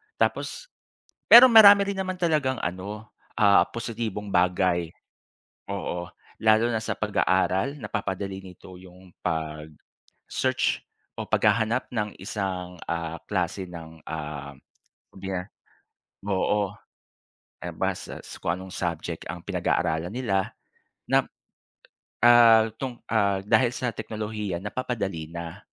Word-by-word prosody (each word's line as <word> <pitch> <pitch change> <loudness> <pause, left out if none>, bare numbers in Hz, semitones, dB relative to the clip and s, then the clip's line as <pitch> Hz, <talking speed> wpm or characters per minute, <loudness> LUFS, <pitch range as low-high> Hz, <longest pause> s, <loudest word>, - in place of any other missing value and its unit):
Tapos - - -1 0.6
pero 240 +2 +12
marami 205 -3 +9
rin 195 - -7
naman 185 -1 -3
talagang 150 -7 +1
ano 100 +5 -5 0.3
ah, 100 -1 +6
positibong 115 -3 -4
bagay, 90 -2 +2 0.8
oo. 90 -3 -4 0.3
Lalo 110 +2 +4
na 115 - 0
sa - - -2
pag-aaral, 100 +4 +1
napapadali 95 0 -4
nito 95 -1 -13
'yong 90 0 -16
pag-search 80 -2 -3 0.4
o - - -4
paghahanap 115 +3 +1
ng 105 -4 -1
isang, 90 -2 -5
ah, 85 -1 -3
klase 95 -1 -2
ng, 80 -2 -10
um, 75 -3 -6 1.7
oo. 105 +2 +1 1.0
Eh - - -6
basta - - -3 0.2
kung 85 - -1
anong 95 +1 -9
subject 85 -2 -4
ang 90 - -6
pinag-aaralan 80 +3 -1
nila 100 -7 -1 0.6
na, - - +4 1.0
ah, 115 -2 +7
tung 130 -3 -5
ah 100 -3 +2
dahil 115 +4 +3
sa 125 0 -2
teknolohiya 105 -5 -4
napapadali 105 -7 -3
na. 85 +1 -7
95 Hz, 105 wpm, -26 LUFS, 90-115 Hz, 1.7 s, pero